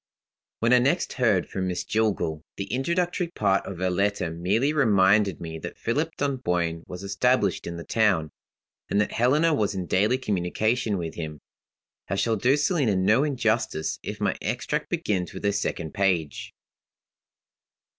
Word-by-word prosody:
When 115 +2 +4
I 125 - +7
next 140 +8 +1
heard 110 -8 +2
from 95 -1 -3
Miss 90 -1 -2
Jillgall, 90 -8 -1
the 100 +2 -4
introductory 170 +6 0
part 100 - 0
of 95 - -6
her 95 +1 0
letter 100 -2 0
merely 100 - +1
reminded 100 - +3
me 80 -1 -6
that - - -7
Philip 150 +8 -1
Dunboyne 90 -12 -1
was 90 +1 -8
established 100 0 +1
in 85 0 -5
the 85 - -6
town, 95 -10 +1 0.6
and 100 - +1
that 105 - +1
Helena 150 +8 +3
was 105 -7 0
in 95 -2 -3
daily 105 +8 +2
communication 110 +1 0
with 85 -2 -4
him. 80 -3 -6 0.7
I 100 - 0
shall 115 +3 +1
do 125 +7 +3
Selina 145 - +1
no 105 +8 +3
injustice 115 - 0
if - - -6
my - - 0
extract - - -2
begins 90 -4 -1
with - - -7
her 100 - +2
second 90 -5 -3
page. 90 -6 0
100 Hz, 155 wpm, -25 LUFS, 90-125 Hz, 0.7 s, I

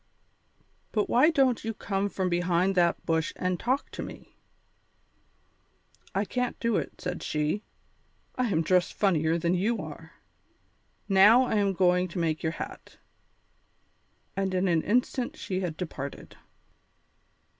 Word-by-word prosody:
"But 210 -2 0
why 260 +7 +6
don't 270 -7 +2
you 225 0 -3
come 200 0 -2
from 190 -1 -2
behind 175 +1 +1
that 175 -2 +1
bush 160 -1 0
and 180 -1 -1
talk 260 +4 -1
to - - -6
me?" - - -10 1.8
"I 200 +2 +1
can't 250 +3 -2
do 230 -2 +1
it," - - -5
said 180 0 -4
she, 150 +6 -1 0.7
"I 255 -1 0
am 165 -6 +1
dressed 180 +2 +2
funnier 165 -5 +2
than 170 +1 0
you 210 +6 +1
are. - - -9 0.9
Now 205 +5 +7
I 235 - 0
am 200 -1 +2
going 180 0 +3
to 175 - -8
make 160 -2 0
your 160 0 -1
hat." - - -8 1.4
And 195 -1 -1
in 185 +1 +1
an 165 -3 +2
instant 245 +4 0
she 185 -1 -3
had 175 -4 -3
departed. 140 -6 -6
185 Hz, 140 wpm, -28 LUFS, 170-215 Hz, 1.8 s, Now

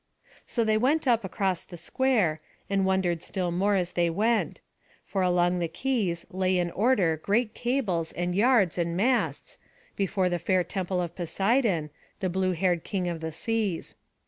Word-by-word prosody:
So 235 - 0
they 215 -1 +2
went 285 +5 +2
up 235 -3 +3
across 190 -1 -1
the 175 - -11
square, 205 -9 +1 0.3
and 195 -1 +2
wondered 185 -3 +1
still 180 -3 -3
more 200 +4 +1
as 180 -2 0
they 170 -1 +1
went; 220 +7 0 0.5
for 195 - -2
along 180 0 +2
the 170 - 0
quays 185 -2 -1
lay 185 0 +1
in 175 -1 0
order 195 -7 +2
great 215 +7 0
cables, 220 -11 -1
and 175 0 -2
yards, 205 -4 +3
and 170 0 -1
masts, 255 - 0 0.4
before 195 -1 0
the 175 -1 -1
fair 185 +2 +1
temple 185 0 -2
of 170 0 -6
Poseidon, 190 - 0 0.3
the 185 -3 -1
blue 185 0 +1
haired 175 -1 0
king 185 -3 -2
of 170 -2 -3
the 160 0 -4
seas. 210 0 -2
185 Hz, 170 wpm, -27 LUFS, 175-215 Hz, 0.5 s, up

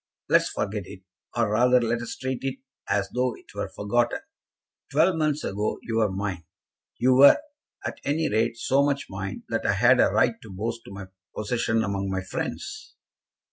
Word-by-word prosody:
"Let - - +6
us - - -3
forget 100 -2 -3
it, 95 -2 -11 0.3
or 115 -3 +2
rather, 125 +3 +5
let 120 0 0
us 120 0 -5
treat 130 -1 -3
it 135 0 -3 0.3
as 100 0 +1
though 125 -1 0
it - - -18
were - - -3
forgotten. 120 - 0 0.7
Twelve 185 - +4
months 155 -2 0
ago 105 +2 -2
you 115 -1 -2
were 110 -3 +2
mine. 95 -3 -3 0.5
You 130 +1 +4
were, 135 +2 +8 0.5
at - - -5
any 155 +3 0
rate, 115 +2 +1
so 135 +4 +2
much 140 -1 0
mine 95 0 -5
that 115 - -1
I - - +2
had 120 +5 +5
a - - +5
right 115 -2 +2
to 110 - -12
boast 115 +5 -4
of - - -9
my 100 0 -7 0.3
possession 115 +1 0
among 100 -1 -2
my 95 0 -2
friends." 95 - -5
115 Hz, 185 wpm, -26 LUFS, 100-125 Hz, 0.7 s, were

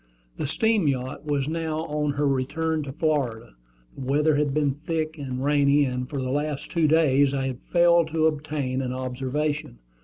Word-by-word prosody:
The - - -2
steam 220 +2 +1
yacht 130 +2 -2
was 145 -2 0
now 160 -1 -2
on 150 -2 -1
her 145 +1 0
return 155 +4 0
to 140 -2 -6
Florida. 130 - -1 0.4
The - - -9
weather 145 +4 +2
had 145 -1 +1
been 145 0 +1
thick 155 +1 -3
and 130 -1 -4
rainy, 145 0 +4
and 125 0 -3
for 145 - -3
the 130 -1 -2
last 145 0 -2
two 165 -3 +2
days 145 -3 +3
I 135 -1 -1
had 130 -2 -4
failed 170 -1 +5
to 160 0 0
obtain 145 -4 -1
an 125 -1 -3
observation. 130 - -3
145 Hz, 180 wpm, -25 LUFS, 135-155 Hz, 0.4 s, failed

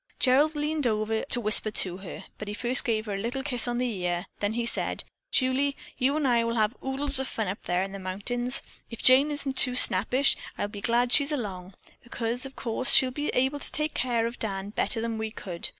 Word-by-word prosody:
Gerald 285 +4 +3
leaned 295 -2 -1
over 220 0 -1
to 255 - +1
whisper 215 -1 +5
to 185 -4 -1
her, 190 -2 -9 0.2
but 210 - -7
he 205 - -5
first 245 +4 +4
gave 220 -2 -1
her 210 - -4
a - - -3
little 240 +5 -4
kiss 250 -4 +3
on 240 0 -2
the 235 -7 -3
ear, 175 0 -2
then 205 +1 -1
he 235 0 -2
said: 235 - -1 0.3
"Julie, 270 +2 +1 0.2
you'n 280 +4 +1
I 240 -3 +2
will 230 0 -2
have 215 +1 0
oodles 270 +1 +2
of 265 - -2
fun 220 -5 -3
up 195 +4 -5
there 180 +1 0
in 195 - -6
the 195 - -7
mountains. 240 +7 -2 0.3
If 230 - -8
Jane 265 +4 +6
isn't 280 -2 -3
too 250 -1 +3
snappish, 250 +5 +4 0.2
I'll 205 - -3
be 205 -1 -9
glad 240 +2 +1
she's 285 +1 +4
along, 195 -9 -5 0.3
because, 240 +2 -2
of 270 - -15
course, 255 +2 -1
she'll 260 -1 +6
be 290 +3 -4
able 265 +3 +1
to - - -8
take 305 0 -2
care 235 -2 0
of 235 +1 -5
Dan 195 -2 -3
better 225 - -1
than 230 -1 -3
we 220 0 -3
could." 180 -5 -2
240 Hz, 225 wpm, -26 LUFS, 210-265 Hz, 0.3 s, Jane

